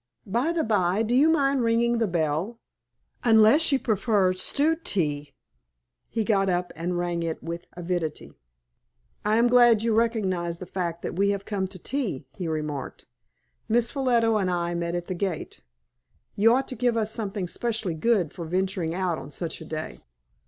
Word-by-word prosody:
By 240 - 0
the 335 -2 0
by, 200 -1 +1
do 225 +2 -1
you 285 +5 +5
mind 280 -4 +2
ringing 235 0 +2
the 225 - +2
bell 170 +6 -1 0.6
unless 230 +7 +5
you 275 - +4
prefer 205 -5 +1
stewed 305 - 0
tea?" 150 - -1 0.7
He 225 -1 -1
got 195 -3 +2
up 180 0 -1
and 175 +2 -2
rang 175 -1 -1
it 165 -1 -4
with 170 +1 -6
avidity. 175 -3 -4 0.9
"I 215 +1 +2
am 235 - +4
glad 240 -3 +5
you 230 -1 +1
recognize 190 -7 0
the 180 - -8
fact 170 -2 -4
that - - -4
we 200 +1 +3
have 200 -1 -2
come 195 -3 -2
to 185 0 -10
tea," 200 - -3
he 180 - -4
remarked. 150 -3 -4 0.6
"Miss 235 +1 +2
Ffolliot 255 -4 +2
and 215 -4 +2
I 175 -1 -1
met 170 0 -2
at 175 0 -3
the 185 - -4
gate. 180 -3 -4 0.7
You 225 +4 +5
ought 265 +1 0
to 255 - -4
give 240 0 +1
us 220 -1 0
something 205 -4 -3
specially 220 -3 -1
good 180 -1 +1
for 170 - -6
venturing 180 -1 -1
out 180 -3 -1
on - - -9
such 165 +2 -5
a - - -8
day." 155 0 -6
195 Hz, 175 wpm, -26 LUFS, 175-230 Hz, 0.9 s, you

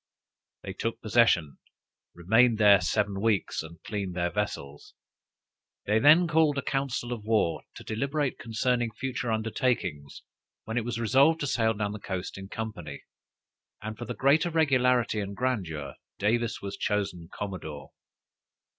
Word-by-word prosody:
They - - -5
took 115 +1 -3
possession, 105 -10 +2 0.6
remained 110 +7 +3
there 100 -3 +6
seven 100 +1 0
weeks, 110 -4 +1
and 80 +1 -12
cleaned 100 -4 -4
their 85 -1 0
vessels. 75 -9 -5 0.9
They 105 +1 +2
then 155 +7 +6
called 160 -3 +3
a 140 - -1
council 135 -3 -2
of 110 -3 -7
war, 110 -6 +1
to - - -10
deliberate 140 +5 -2
concerning 120 +1 0
future 125 -1 -3
undertakings, 110 - -2 0.4
when 110 - -5
it 115 - -5
was 120 -1 -3
resolved 135 +8 +4
to - - 0
sail 110 -4 +1
down 105 -1 -2
the 105 - -6
coast 95 -2 -5
in 95 0 -8
company; 90 -11 -6 0.8
and, 110 0 -6
for 120 - -7
the - - -5
greater 150 +6 +3
regularity 125 -8 +2
and 100 0 -4
grandeur, 95 - -2 0.2
Davis 115 +2 0
was 100 0 -5
chosen 95 -5 -2
Commodore. 80 -8 -6
110 Hz, 145 wpm, -28 LUFS, 95-125 Hz, 0.9 s, there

